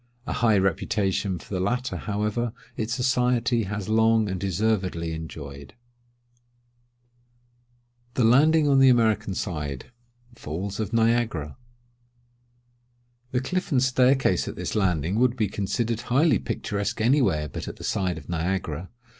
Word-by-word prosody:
A - - -3
high 110 -3 +3
reputation 95 0 0
for 100 - -11
the 95 - -1
latter, 125 +7 -1
however, 105 +3 -2 0.2
its 110 +1 -3
society 125 -1 +1
has 100 0 -4
long 110 0 +3
and 95 -1 -3
deservedly 95 -4 -1
enjoyed. 70 - -8 2.4
THE 125 - +2
LANDING 150 +7 +5
ON 140 -1 +4
THE 135 0 +7
AMERICAN 110 -4 +2
SIDE. 75 - -4 0.4
(FALLS 95 +1 -5
OF 110 -1 -2
NIAGARA.) 115 - +1 1.7
The 125 -1 -1
cliff 185 +8 -3
and 130 -3 +3
staircase 130 -6 +3
at - - -5
this - - -4
Landing 95 -1 0
would 125 0 +3
be 110 -3 +1
considered 110 +4 -2
highly 140 +6 +3
picturesque 100 -1 -3
any 130 +6 +3
where 75 -10 +1
but - - -7
at - - -6
the - - -12
side 90 -4 -1
of 80 - -10
Niagara. 85 -1 -2
105 Hz, 135 wpm, -25 LUFS, 95-120 Hz, 2.4 s, THE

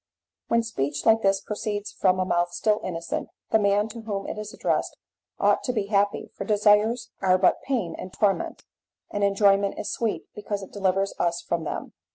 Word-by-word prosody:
When 230 0 +2
speech 145 -10 -3
like 225 0 +5
this 195 -1 +2
proceeds 210 -1 -4
from 185 -1 +2
a 185 - +1
mouth 175 -1 +1
still 215 +2 +1
innocent, 170 -2 -3 0.2
the 220 - +5
man 205 +1 +2
to 230 +1 -8
whom 200 -3 -4
it - - -4
is 210 0 -6
addressed - - -1 0.4
ought - - +3
to 250 - 0
be 210 -4 0
happy, 200 0 +1
for - - -4
desires 210 +3 +3
are 185 -1 +4
but 185 - +3
pain 230 -12 -1
and 185 - -7
torment, 200 0 0 0.5
and 205 - -1
enjoyment 200 0 +3
is - - -3
sweet 225 -3 -2
because 205 -1 -4
it - - -12
delivers 195 0 +1
us 170 0 0
from 170 -1 -2
them. - - -5
200 Hz, 190 wpm, -25 LUFS, 185-215 Hz, 0.5 s, like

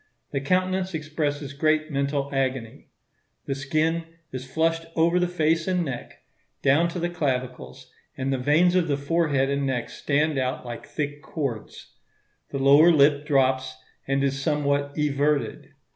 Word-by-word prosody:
The 140 - -1
countenance 185 +3 0
expresses 150 -2 -3
great 155 +1 +1
mental 140 0 -1
agony. 130 -4 -2 0.6
The 135 - -1
skin 155 +5 0 0.3
is 130 0 -7
flushed 165 +2 0
over 170 +2 +3
the 180 - +2
face 165 -1 +1
and 180 -2 +1
neck, 130 -4 -7 0.4
down 145 +5 +4
to 175 - -5
the 170 - 0
clavicles, 130 -5 -4 0.3
and 135 0 -1
the 130 - -1
veins 155 +7 +3
of 180 -2 +2
the 140 -2 0
forehead 140 -2 +1
and 140 0 0
neck 130 -3 -2
stand 150 0 0
out 130 0 -2
like 120 -1 -7
thick 145 -1 -4
cords. 135 -10 -5 0.6
The 140 - -4
lower 140 +5 +6
lip 145 -1 +4
drops, 130 -2 +2 0.3
and 135 0 +1
is 135 0 0
somewhat 140 -1 0
everted. 145 -4 0
145 Hz, 150 wpm, -25 LUFS, 135-160 Hz, 0.6 s, lower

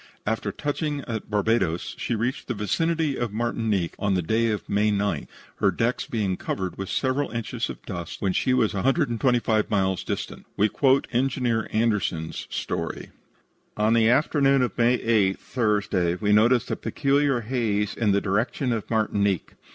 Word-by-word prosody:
After 110 -1 -1
touching 145 - -2
at 115 -4 -5
Barbados, 105 -5 0
she 120 - -1
reached 120 +4 -2
the 125 - -2
vicinity 160 +7 0
of 120 -3 -1
Martinique 110 -5 -1
on 100 -2 +1
May - - +2
9th, 105 -3 0 0.3
her - - +3
decks 115 +2 -1
being 100 -5 -1
covered 95 -2 -3
with 95 -1 -5
several 135 +2 0
inches 115 0 -3
of - - -9
dust 85 -5 -6
when 95 -2 0
she 130 - +1
was 115 -4 +2
a 95 - -1
hundred 135 - +2
and 115 - -3
twenty 125 -3 +4
five 110 -2 0
miles 95 -3 +1
distant. - - -5
We 105 +2 +3
quote 135 +3 +2
engineer 125 -3 0
Anderson's 105 -8 -1
story: - - -4 0.7
"On 105 +1 +3
the 115 -1 +4
afternoon 135 0 +3
of 125 - -2
May 120 +1 +3
8 105 -6 +2
(Thursday) 105 -7 0
we 105 +2 +1
noticed 115 +3 +4
a - - +1
peculiar 140 -3 +1
haze 110 -4 -1
in 110 -3 +1
the 100 0 +2
direction 120 +5 0
of 110 -3 -4
Martinique. 100 -4 0
110 Hz, 165 wpm, -25 LUFS, 100-125 Hz, 0.7 s, twenty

